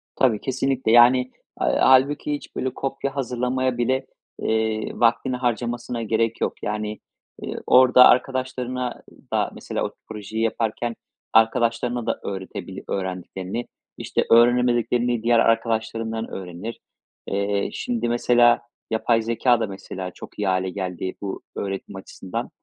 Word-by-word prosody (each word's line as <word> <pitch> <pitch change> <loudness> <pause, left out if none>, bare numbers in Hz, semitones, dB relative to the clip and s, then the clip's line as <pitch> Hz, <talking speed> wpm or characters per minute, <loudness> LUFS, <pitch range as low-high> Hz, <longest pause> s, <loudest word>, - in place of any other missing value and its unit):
Tabii, 115 -6 +2
kesinlikle 130 -2 0
yani, 120 +2 +7 0.4
eee, - - +1
hâlbuki 135 +3 +4
hiç 145 - -7
böyle 130 0 -2
kopya 135 0 -3
hazırlamaya 125 -1 -1
bile, 130 +2 0 0.4
eee, 110 0 0
vaktini 120 +2 +2
harcamasına 120 -1 -2
gerek 115 +1 0
yok. - - 0
Yani, 105 0 -3 0.4
eee, - - -5
orada 125 0 +7
arkadaşlarına 125 -1 0 0.3
da - - +1
mesela - - -4
o - - -4 0.2
projeyi 110 +1 -4
yaparken 115 +1 -1 0.4
arkadaşlarına 115 +1 +2
da - - -1
öğretebilir 95 0 -6
öğrendiklerini, 95 +3 -4 0.3
işte, - - -1
öğrenemediklerini 120 0 +3
diğer 120 0 +4
arkadaşlarından 115 0 0
öğrenir. 95 +4 -7 0.5
Eee, 100 0 0
şimdi, 245 - -2
mesela 120 0 +4 0.3
yapay 115 +1 +2
zekâ 115 +2 +2
da 110 - -1
mesela 95 -1 -7
çok - - -12
iyi 105 - 0
hâle 95 0 +1
geldi 95 -1 -4
bu 100 -1 -5
öğretim 95 0 -5
açısından 95 -1 -6
115 Hz, 125 wpm, -23 LUFS, 105-125 Hz, 0.5 s, yani